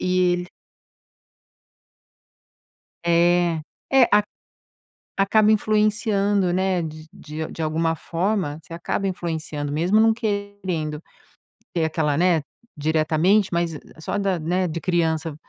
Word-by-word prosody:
e 180 -1 +2
ele 180 0 -3 2.6
É, 170 -1 +3 0.3
é. 270 -1 +6
A 210 - +6 0.9
acaba 210 +2 +4
influenciando, 205 -3 +2
né, 185 -1 +1
de 155 0 -7
de 155 +1 -6
de 165 - -7
alguma 160 +1 0
forma, 170 -2 -2
você 165 +1 -11
acaba 195 +3 -2
influenciando, 160 -5 -3
mesmo 175 +8 +2
não 225 0 +5
querendo 200 -8 -3 0.7
ter 165 -2 0
aquela, 155 -2 0
né, 175 -3 +3 0.3
diretamente, 160 +6 +2
mas 170 -1 0
e 150 - -7 0.2
só 160 - -3
da 195 -3 0
né, 180 +3 0
de 160 - -4
criança, 165 -3 0
175 Hz, 115 wpm, -23 LUFS, 160-195 Hz, 2.6 s, é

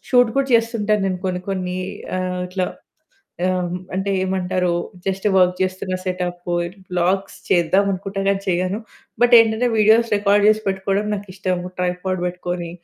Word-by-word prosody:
Shoot 245 -3 +5
కూడా 275 -1 +2
చేస్తుంటాను 225 -3 +2
నేను 185 -1 -1
కొన్ని 180 -1 -1
కొన్ని 185 -2 -2 0.4
ఆహ్, 185 0 -2
ఇట్లా 185 0 -2 0.8
ఆహ్, 180 -1 0 0.2
అంటే 195 +1 -1
ఏమంటారు 185 -1 0 0.4
జస్ట్ 195 +1 -1
వర్క్ 180 -1 +4
చేస్తున్నా 185 0 -2
సెటప్ 180 -1 -3 0.4
వ్లాగ్స్ 185 +2 0
చేద్దామనుకుంటా 195 +2 +1
గానీ 195 0 +1
చేయను. 185 +3 0 0.4
బట్ 245 0 +6
ఏంటంటే 225 +2 +2
వీడియోస్ 220 +2 +4
రికార్డ్ 205 0 +3
చేసి 215 0 +3
పెట్టుకోవడం 195 +2 -1
నాకిష్టం. 185 -2 -3 0.2
ట్రైపడ్ 180 +1 -1
పెట్టుకొని. 175 -1 -4
190 Hz, 130 wpm, -21 LUFS, 180-205 Hz, 0.8 s, బట్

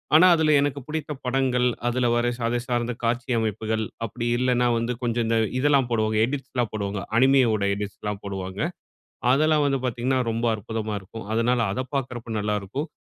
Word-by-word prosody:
ஆனா, 160 +4 +8
அதில 160 -1 +2
எனக்கு 145 0 0
பிடித்த 155 0 -4
படங்கள், 125 -1 +1 0.2
அதுல 125 0 +1
வர 120 0 +2
அதை 120 0 0
சார்ந்த 120 -1 -1
காட்சி 120 +2 -1
அமைப்புகள், 110 0 -1 0.2
அப்டி 120 +2 -4
இல்லைன்னா 125 -1 +2
வந்து 115 +1 -1
கொஞ்சம் 120 -1 0
இந்த 115 0 +2 0.2
இதெல்லாம் 140 -2 +3
போடுவாங்க, 110 -2 +1
எடிட்ஸ்லாம் 130 -3 -2
போடுவாங்க. 100 -1 -2 0.2
அனிமே 135 +2 +5
உடைய 100 -2 +1
எடிட்ஸ்லாம் 105 0 -5
போடுவாங்க. 95 0 -5 0.7
அதெல்லாம் 155 +2 +3
வந்து 135 -1 +1
பாத்தீங்கன்னா 125 +2 0
ரொம்ப 115 +1 -1
அற்புதமா 110 +1 -4
இருக்கும். 100 +4 -10
அதனால 120 +2 +2
அதை 130 - -2
பாக்குறப்ப 120 -4 -3
நல்லா 105 0 0
இருக்கும். 135 - -4
120 Hz, 160 wpm, -24 LUFS, 110-130 Hz, 0.7 s, ஆனா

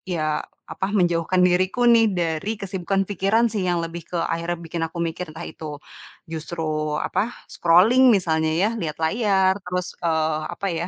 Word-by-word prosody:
iya, 155 -2 0 0.3
apa, 190 - -2
menjauhkan 175 -1 +2
diriku 185 +6 +2
nih, 230 -1 +6
dari 170 +5 -1
kesibukan 195 0 -1
pikiran 205 +4 +2
sih, 205 -4 -2
yang 175 -1 +1
lebih 165 0 -6
ke 175 - -4
akhirnya 170 +1 -2
bikin 170 0 -5
aku 165 - -11
mikir, 165 +1 -4
entah 170 - -6
itu 150 -2 -7 0.5
justru, 155 -2 -3
apa, 230 +4 -1 0.2
scrolling 205 +10 +5
misalnya 160 -5 +1
ya, 190 +6 +2
lihat 155 -5 -4
layar, 190 +1 +2
terus, 180 0 -3
eee, 160 -2 0
apa 200 - -4
ya, 170 +1 -2
175 Hz, 160 wpm, -23 LUFS, 160-195 Hz, 0.5 s, nih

